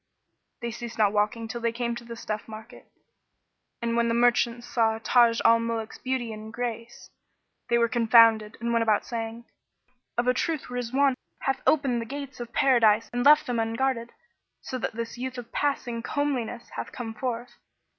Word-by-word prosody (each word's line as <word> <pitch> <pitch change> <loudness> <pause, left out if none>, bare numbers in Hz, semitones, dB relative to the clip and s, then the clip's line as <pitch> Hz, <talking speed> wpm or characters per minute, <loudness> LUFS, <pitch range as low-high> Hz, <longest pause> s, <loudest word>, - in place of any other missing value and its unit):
They 235 - -2
ceased 235 0 -7
not 210 -2 +3
walking 210 +2 0
till 235 +1 -6
they 230 0 +1
came 235 0 -2
to - - -9
the 235 0 -8
stuff 215 -2 -5
market, 220 +3 -11 1.0
and 230 0 0
when 235 0 +2
the 230 - +1
merchants 240 0 +2
saw 225 -3 +1
Taj 230 0 +4
al 230 0 +6
Muluk's 230 -1 -4
beauty 255 -3 -2
and 215 0 -9
grace, 235 0 -6 0.6
they 235 - +4
were 235 0 +3
confounded 230 -2 +5
and 235 0 -1
went 230 - +3
about 220 -2 +2
saying, 230 0 -5 0.7
"Of 240 +1 +1
a 250 - +5
truth 310 +3 -1
Rizwán[FN#14] 250 +3 +1 0.3
hath 270 - -1
opened 270 -6 +2
the 230 - -6
gates 275 0 -7
of 240 -1 -7
Paradise 230 -5 +3
and 245 0 0
left 295 +2 +7
them 245 -2 -1
unguarded, 230 +1 -1 0.5
so 255 - -5
that - - -3
this 230 +1 -5
youth 260 0 -4
of 235 -1 -8
passing 245 -5 -1
comeliness 250 -4 -2
hath - - -6
come 230 -3 -6
forth." 240 +1 -4
235 Hz, 175 wpm, -26 LUFS, 230-245 Hz, 1.0 s, left